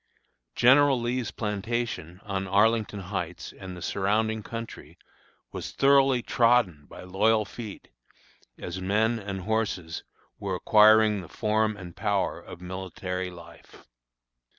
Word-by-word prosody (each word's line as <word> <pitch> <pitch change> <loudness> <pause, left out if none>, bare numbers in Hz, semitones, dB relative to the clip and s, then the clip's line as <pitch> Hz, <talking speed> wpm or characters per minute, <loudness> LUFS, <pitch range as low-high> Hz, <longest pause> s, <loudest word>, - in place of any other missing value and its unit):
General 135 +1 +5
Lee's 120 0 -2
plantation, 105 -4 -3
on 95 -1 -3
Arlington 105 +1 +2
Heights, 90 -2 -5
and 95 -2 -9
the 90 - -8
surrounding 110 +3 0
country, 115 +2 -8 0.5
was - - -5
thoroughly 135 -3 +4
trodden 115 -11 +2
by - - -11
loyal 105 +4 +2
feet, 105 -1 -9 0.7
as 90 +1 -6
men 110 +5 +1
and 100 -2 -5
horses 100 -6 -2 0.4
were - - -2
acquiring 110 -1 +5
the 85 - -12
form 110 -1 0
and 90 -3 -10
power 100 -2 -1
of 85 - -12
military 90 0 -5
life. 85 -2 -15
105 Hz, 120 wpm, -27 LUFS, 95-115 Hz, 0.7 s, General